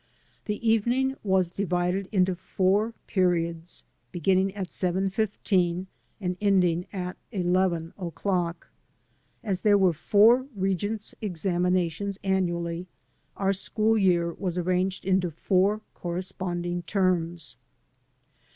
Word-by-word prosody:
The 210 +2 -3
evening 240 +4 +2
was 190 -3 +1
divided 180 0 -1
into 185 -2 +3
four 195 +5 0
periods, 170 -3 -1 0.3
beginning 190 +2 +2
at 190 -3 -5
seven 190 +1 0
fifteen 185 -4 0 0.3
and 180 -3 -2
ending 180 -4 +2
at 180 -2 -4
eleven 180 -4 0
o'clock. 175 -1 -2 0.7
As 195 -5 -1
there 205 -2 +5
were 190 -3 +4
foiu* 225 - +4
Regents' 200 +3 -2
examinations 180 0 0
annually, 175 -2 -1 0.5
our 195 0 +2
school 215 +3 0
year 175 -5 +2
was 180 -1 -3
arranged 185 +1 0
into 185 -2 +2
four 190 +6 +1
corresponding 175 0 -3
terms. 175 -4 -1
185 Hz, 105 wpm, -27 LUFS, 175-200 Hz, 0.7 s, there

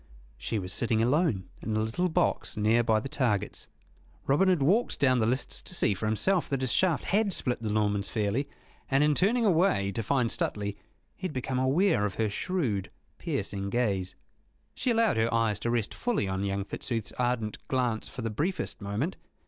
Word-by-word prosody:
She 110 - -2
was 95 -1 -4
sitting 115 -3 +1
alone 125 - +1
in 110 -1 -2
a - - +2
little 110 +12 0
box 160 - 0
near 110 +3 +3
by 110 -2 +2
the 110 - -5
targets. 125 -8 -1 0.6
Robin 150 +8 +3
had 175 -7 +3
walked 205 - +2
down 130 -3 +4
the 110 - +2
lists 130 +4 -1
to 185 - -5
see 110 - +2
for 105 +3 -3
himself 165 - +1
that 135 -2 -1
his 130 -3 0
shaft 170 +4 +2
had 205 +1 +2
split 125 -9 0
the 110 - -2
Norman's 105 -1 +1
fairly, 110 +6 -1 0.4
and 135 +2 +3
in 150 0 +4
turning 225 - +2
away 160 - +3
to 105 - -2
find 125 +1 +1
Stuteley 100 -1 -2 0.4
he 185 - -3
had 160 - -8
become 130 0 -2
aware 145 - +3
of 95 - -7
her 110 -2 0
shrewd, 120 - -1 0.3
piercing 100 0 -3
gaze. 100 -5 -1 0.6
She 255 - -2
allowed 230 - +3
her 115 +1 +2
eyes 115 -3 +1
to 115 - -2
rest 115 -3 0
fully 240 - -1
on 95 +1 -2
young 100 0 -2
Fitzooth's 115 0 -4
ardent 120 -3 -1
glance 125 -4 -1
for 125 - -7
the 115 - -2
briefest 165 - -2
moment. 105 - -2
120 Hz, 190 wpm, -28 LUFS, 105-150 Hz, 0.6 s, down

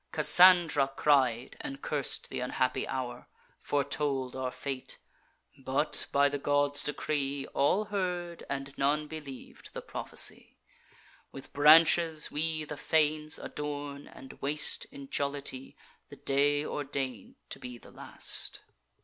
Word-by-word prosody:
Cassandra 175 -6 +6
cried, 130 -5 +2
and 135 0 -6
curs'd 145 -3 0
th' - - -5
unhappy 125 0 -1
hour; 125 -2 -5 0.3
Foretold 140 -2 -2
our 130 -1 -2
fate; 135 0 -6 0.6
but, - - 0
by 140 0 +4
the 145 0 -3
god's 145 0 +1
decree, 145 -1 -2
All 185 +10 +2
heard, 180 -4 -3
and 135 0 -5
none 150 +2 +2
believ'd 145 -4 -10
the - - -4
prophecy. - - -3 0.7
With 135 - -11
branches 160 +2 +5
we 155 +1 -1
the 150 -1 -7
fanes 155 0 +1
adorn, 145 -1 -6
and 135 - -12
waste, 145 +1 +2
In 140 -1 -11
jollity, 140 -2 -3 0.3
the - - -11
day 145 +2 +1
ordain'd 135 -5 -4 0.2
to - - -5
be 125 -1 -8
the - - -16
last. - - -2
145 Hz, 125 wpm, -30 LUFS, 135-150 Hz, 0.7 s, Cassandra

